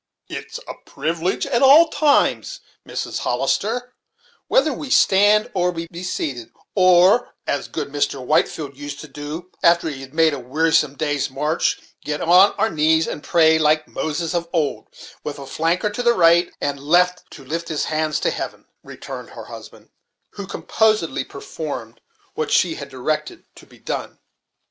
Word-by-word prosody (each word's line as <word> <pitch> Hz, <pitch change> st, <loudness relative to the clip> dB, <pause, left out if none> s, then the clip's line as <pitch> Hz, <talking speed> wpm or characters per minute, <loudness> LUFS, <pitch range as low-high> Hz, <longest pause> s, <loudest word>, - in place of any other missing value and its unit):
"It's -, -, -7 dB
a -, -, -5 dB
privilege 165 Hz, +3 st, -2 dB
at 240 Hz, -, 0 dB
all 295 Hz, +5 st, +7 dB
times, 290 Hz, -2 st, +1 dB, 0.3 s
Mrs. -, -, -4 dB
Hollister, 245 Hz, +4 st, -1 dB, 0.5 s
whether 285 Hz, +2 st, +3 dB
we 275 Hz, +2 st, -7 dB
stand 205 Hz, -1 st, +4 dB
or 180 Hz, -1 st, +1 dB
be 165 Hz, -1 st, -5 dB, 0.2 s
seated; 140 Hz, -9 st, -4 dB, 0.2 s
or, 185 Hz, +4 st, +4 dB
as 140 Hz, -, -2 dB
good 150 Hz, -3 st, -5 dB
Mr. 145 Hz, 0 st, -1 dB
Whitefleld 145 Hz, +1 st, 0 dB
used 145 Hz, 0 st, -7 dB
to 155 Hz, -, -10 dB
do 150 Hz, +5 st, -8 dB
after 170 Hz, 0 st, +4 dB
he 135 Hz, -3 st, -7 dB
had 135 Hz, +2 st, -12 dB
made 160 Hz, -1 st, +4 dB
a 140 Hz, -, -4 dB
wearisome 150 Hz, +2 st, +1 dB
day's 145 Hz, -2 st, -1 dB
march, 150 Hz, +5 st, 0 dB, 0.2 s
get 150 Hz, 0 st, -3 dB
on 180 Hz, +4 st, +5 dB
our 225 Hz, -, 0 dB
knees 160 Hz, +1 st, +3 dB
and -, -, -5 dB
pray, 160 Hz, -2 st, +4 dB
like 155 Hz, 0 st, +2 dB
Moses 160 Hz, +2 st, -3 dB
of 170 Hz, -1 st, -2 dB
old, 160 Hz, -5 st, -1 dB, 0.4 s
with 150 Hz, -, -5 dB
a 140 Hz, -, -8 dB
flanker 170 Hz, +9 st, -1 dB
to 245 Hz, -, -3 dB
the 240 Hz, -1 st, +4 dB
right 170 Hz, -2 st, +4 dB
and 140 Hz, -1 st, -2 dB
left 180 Hz, +5 st, +2 dB
to 135 Hz, -, -12 dB
lift 165 Hz, +4 st, -4 dB
his 155 Hz, -2 st, -2 dB
hands 155 Hz, 0 st, -1 dB
to -, -, +1 dB
heaven," -, -, -6 dB, 0.2 s
returned -, -, -9 dB
her -, -, -10 dB
husband, -, -, -12 dB, 0.4 s
who 200 Hz, -2 st, -8 dB
composedly 215 Hz, -10 st, 0 dB
performed 140 Hz, -4 st, -7 dB, 0.3 s
what -, -, -3 dB
she -, -, +3 dB
had 140 Hz, -, -8 dB
directed 150 Hz, +4 st, -3 dB
to -, -, -16 dB
be -, -, -19 dB
done. -, -, -5 dB
160 Hz, 165 wpm, -21 LUFS, 145-185 Hz, 0.5 s, all